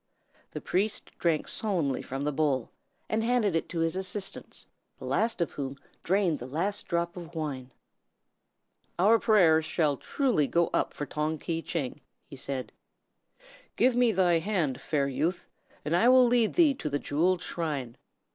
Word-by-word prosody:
The - - -7
priest 200 +4 -1
drank 165 -3 +1
solemnly 170 - -1
from 135 +2 -5
the 150 - 0
bowl, 140 -4 0 0.4
and 220 +1 0
handed 225 -6 +2
it 165 - -1
to 170 -2 -2
his 165 +1 0
assistants, 190 +1 -4 0.3
the - - -9
last 225 -4 0
of 170 - 0
whom 135 -1 -5 0.2
drained 185 -4 +1
the 125 - -7
last 175 +9 -2
drop 170 0 -1
of 170 -1 -9
wine. 140 -5 -4 1.3
"Our 215 +6 +5
prayers 170 -9 +4
shall 155 -2 +1
truly 245 - 0
go 170 +3 +1
up - - +1
for 145 - -4
Tong 150 +2 -2
Ki 165 +2 -3
Tcheng," 150 -5 -4 0.3
he 145 - -11
said. 135 -1 -5 1.0
"Give 255 -1 +3
me 245 -2 +4
thy 180 -4 +3
hand, 160 -9 -1
fair 140 -3 0
youth, 165 +6 -2 0.4
and 155 - +1
I 230 +8 +5
will 255 0 +7
lead 240 -2 +2
thee 325 -5 +5
to 155 - -5
the 145 - 0
Jewelled 175 +6 0
Shrine. 140 -8 -3
170 Hz, 165 wpm, -28 LUFS, 145-205 Hz, 1.3 s, will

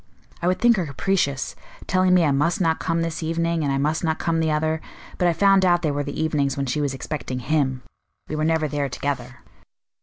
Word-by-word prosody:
I 175 - 0
would 185 +1 +2
think 235 -2 +4
her 180 - 0
capricious 140 -1 -1 0.3
telling 185 -1 +3
me 180 - +5
I 145 - +2
must 150 +8 +1
not 165 -3 +1
come 165 -1 0
this 165 0 -3
evening, 165 0 0
and 140 - 0
I 135 - +1
must 150 +4 0
not 160 -1 0
come 165 -1 0
the 160 -1 +1
other; 155 +1 0 0.4
but 180 - +3
I 170 - +3
found 195 +2 +4
out 175 -1 +3
they 155 - +1
were 145 0 -1
the 145 0 -5
evenings 145 -4 0
when 140 - -1
she 135 +3 -1
was 140 -2 -1
expecting 130 -2 -4
him. 130 -1 0 0.4
We 155 - -4
were 155 - -1
never 160 -1 +1
there 145 -1 -2
together." 125 -2 -4
155 Hz, 225 wpm, -23 LUFS, 140-170 Hz, 0.4 s, me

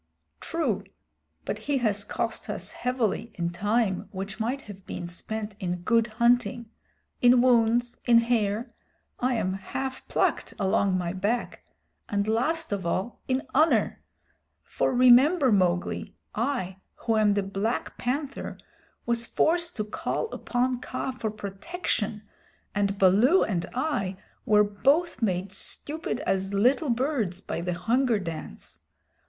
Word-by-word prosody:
"True, - - -1 0.6
but - - -3
he 285 - +3
has 210 -5 +1
cost 205 - -3
us - - -3
heavily 235 -3 -1
in 170 -1 -2
time 205 +1 0
which 195 +2 -6
might 250 +5 -2
have 195 -2 -11
been 175 - -5
spent 210 +4 -5
in 180 -3 -3
good 230 +3 +3
hunting, 235 0 +1 0.5
in 245 0 +6
wounds, 240 -1 +3
in 235 -2 +6
hair 230 0 +1 0.5
I 250 0 +1
am 185 -4 0
half 260 +7 -5
plucked - - 0
along 190 -1 +2
my 175 -1 -2
back 205 +6 -2 0.5
and 200 0 0
last 310 +9 +1
of 200 -2 -1
all, 185 +7 -2
in 260 0 0
honor. 310 +4 +3 0.6
For, - - 0
remember, 255 +4 +6
Mowgli, 180 -3 +1 0.2
I, 220 -6 -2 0.2
who 225 - -1
am 210 -2 +4
the 200 - +1
Black 200 +4 -2
Panther, 275 +3 -3 0.5
was 235 0 0
forced 340 +1 +1
to 215 - -1
call 215 - -3
upon 250 0 -1
Kaa 255 +1 -3
for 235 -4 -3
protection, 210 - -3 0.5
and 200 -1 0
Baloo 210 - +5
and 175 -5 -1
I 220 -10 -1 0.3
were 210 -1 +6
both 275 +12 +1
made 190 -3 0
stupid 290 +6 -4
as 195 -6 -1
little 255 +8 +3
birds 235 - 0
by 180 - -4
the 180 +1 -2
Hunger 235 +6 +2
Dance. 165 - -7
225 Hz, 135 wpm, -27 LUFS, 195-255 Hz, 0.6 s, in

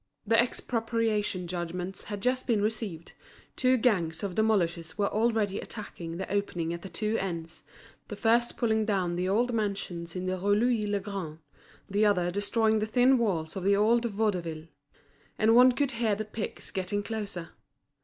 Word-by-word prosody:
The 225 +2 +4
expropriation 225 -5 -1
judgments 175 +2 -5
had 205 -2 -5
just 255 +3 0
been 220 -4 +2
delivered, 210 -7 -5 0.4
two 255 0 +3
gangs 185 -10 +1
of 195 -3 -2
demolishers 175 -6 0
were 200 -1 +1
already 215 -3 +1
attacking 170 -6 -7
the 190 - -4
opening 175 -5 -1
at 170 - -6
the 195 - -8
two 215 +6 -1
ends, 170 -3 -5 0.5
the - - -6
first 235 +1 +2
pulling 220 -2 +2
down 190 -5 0
the 180 +1 -1
old 240 +5 +2
mansions 195 -6 -3
in 180 0 -3
the 185 0 -1
Rue 205 +2 +2
Louis 225 -1 +2
le 205 0 0
Grand, 190 -6 -5 0.5
the 205 +2 +1
other 180 -4 +3
destroying 220 +3 +1
the 215 - -1
thin 250 +3 +4
walls 170 -9 -1
of 190 - -4
the 200 +1 +4
old 230 +4 +3
Vaudeville; 185 -8 -1 0.7
and 220 +1 +4
one 250 +1 +8
could 275 +1 0
hear 230 -3 +1
the 215 +2 -4
picks 215 0 -6
getting 200 +1 -2
closer. 200 -6 -5
205 Hz, 170 wpm, -29 LUFS, 180-225 Hz, 0.7 s, one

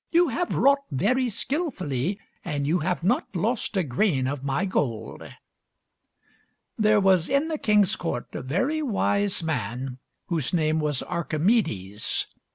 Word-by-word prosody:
You 345 -1 +4
have 350 +8 -1
wrought 280 +2 +5
very 240 - +1
skillfully 200 - -2 0.2
and 145 -5 -2
you 165 +5 +2
have 175 +2 -1
not 205 +1 0
lost 220 +3 -1
a 190 - +3
grain 135 0 +1
of 135 0 -3
my 140 +7 0
gold." 130 - -2 1.5
There 215 -1 +4
was 190 -4 +3
in 280 +4 +2
the 310 -2 -2
king's 210 -3 +4
court 165 -8 -3
a - - -4
very 255 - 0
wise 205 - 0
man 130 -3 -3 0.3
whose 160 -5 -2
name 155 -1 +2
was 150 -3 0
Archimedes. 155 - 0
180 Hz, 140 wpm, -25 LUFS, 140-225 Hz, 1.5 s, wrought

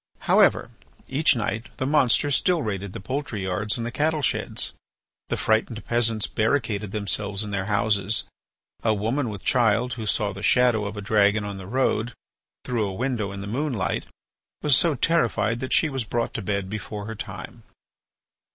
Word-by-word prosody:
However, - - +4 0.4
each 145 +1 +3
night 110 +1 -2
the 130 - -1
monster 145 0 +3
still 170 +3 +2
raided 100 -3 -4
the - - -6
poultry 130 -2 -4
yards 100 +4 0
and 115 - -3
the 120 - -3
cattle 150 +3 0
sheds. - - 0 0.6
The - - -1
frightened 110 +1 0
peasants 115 -2 +2
barricaded 110 -4 0
themselves 100 -1 -1
in 105 - -6
their 100 -1 -1
houses. 105 0 +1 0.6
A 110 -1 +3
woman 115 +5 -1
with 100 -3 -7
child 120 0 +2
who 110 -3 -5
saw 105 -1 +1
the 100 - -8
shadow 120 0 +3
of 105 +1 -5
a - - -4
dragon 105 0 +3
on 100 -1 -5
the 95 - -9
road 125 -1 0 0.5
through 115 -4 0
a 95 - -4
window 120 -4 -1
in 100 0 -6
the - - -5
moonlight, 120 -1 -2 0.6
was 150 -3 +5
so 165 +1 +2
terrified 120 -6 +1
that 130 - -5
she 155 - +4
was 135 -4 -2
brought 115 +2 -2
to 115 - -3
bed 100 -1 -2
before 105 0 -5
her 110 - -5
time. 110 - -8
110 Hz, 175 wpm, -25 LUFS, 100-125 Hz, 0.6 s, was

